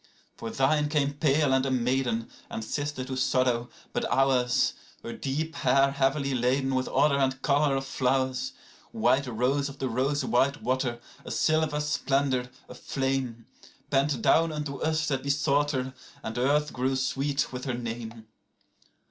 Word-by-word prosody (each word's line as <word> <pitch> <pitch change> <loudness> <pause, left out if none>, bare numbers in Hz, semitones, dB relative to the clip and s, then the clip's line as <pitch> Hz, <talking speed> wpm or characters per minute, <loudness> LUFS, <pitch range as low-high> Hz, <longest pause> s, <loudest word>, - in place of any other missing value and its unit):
81For 115 - -4
thine 150 +2 +2
came 145 -2 +1
pale 145 -1 +2
and 130 0 +3
a 135 - 0
maiden, 125 -2 0 0.2
and 110 - -5
sister 145 +1 -3
to 130 0 -4
sorrow; 130 -2 +1 0.2
but - - -1
ours,82Her 125 -3 0
deep 155 +4 -2
hair 135 +2 +3
heavily 140 0 +1
laden 130 +2 +1
with 130 0 0
odour 140 -1 +3
and 135 -1 +1
colour 145 0 +3
of 135 0 -2
flowers,83White 130 - -1
rose 140 +3 +1
of 140 - -10
the 135 - -2
rose 135 +4 0
white 135 +3 +1
water, 125 -1 -1 0.2
a - - -8
silver 155 -1 +1
splendour, 135 -3 0 0.2
a - - -10
flame,84Bent 135 +2 -2
down 165 0 +4
unto 150 -2 -4
us 160 +2 0
that 135 -2 0
besought 140 +1 +1
her, 130 -2 -2 0.3
and 110 - -5
earth 150 +4 +2
grew 130 +2 0
sweet 135 +1 -1
with 125 0 -5
her 130 -3 -1
name. 115 -1 -6
135 Hz, 150 wpm, -27 LUFS, 130-145 Hz, 0.3 s, down